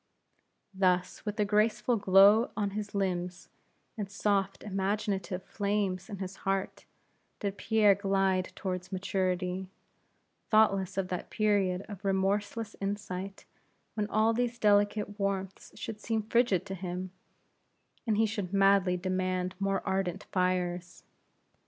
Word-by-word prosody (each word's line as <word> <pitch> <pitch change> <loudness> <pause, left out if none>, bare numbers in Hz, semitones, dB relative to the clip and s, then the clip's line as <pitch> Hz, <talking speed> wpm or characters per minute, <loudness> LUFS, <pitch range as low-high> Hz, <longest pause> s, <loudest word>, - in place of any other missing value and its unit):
Thus, 185 -1 +1
with 210 0 -4
a 210 - +3
graceful 215 +3 +2
glow 200 +3 +6
on 205 -2 0
his 210 0 -5
limbs, 180 -2 -2 0.5
and 205 -4 -4
soft, 200 -1 0
imaginative 195 -2 -2
flames 200 -2 -2
in 205 - -5
his 190 0 -6
heart, 195 0 -2 0.5
did 200 -1 -2
this - - -12
Pierre 220 -3 +5
glide 195 -2 +1
toward 185 -1 -4
maturity, 185 -1 -1 0.8
thoughtless 195 -4 +3
of 190 -1 -1
that 180 - -4
period 200 -3 +1
of 205 -2 -9
remorseless 200 +3 0
insight, 195 -1 -4 0.5
when 210 -2 -1
all 220 +2 +3
these 240 0 -1
delicate 205 0 +2
warmths 195 -1 -3
should 215 -2 -6
seem 220 -1 -1
frigid 220 -4 +2
to 195 - -5
him, 180 0 -5 1.0
and 215 -2 +2
he 225 - +4
should 205 -4 -3
madly 195 -2 +4
demand 185 0 -1
more 195 -1 0
ardent 190 0 -1
fires. 180 -1 -1
195 Hz, 125 wpm, -30 LUFS, 185-210 Hz, 1.0 s, glow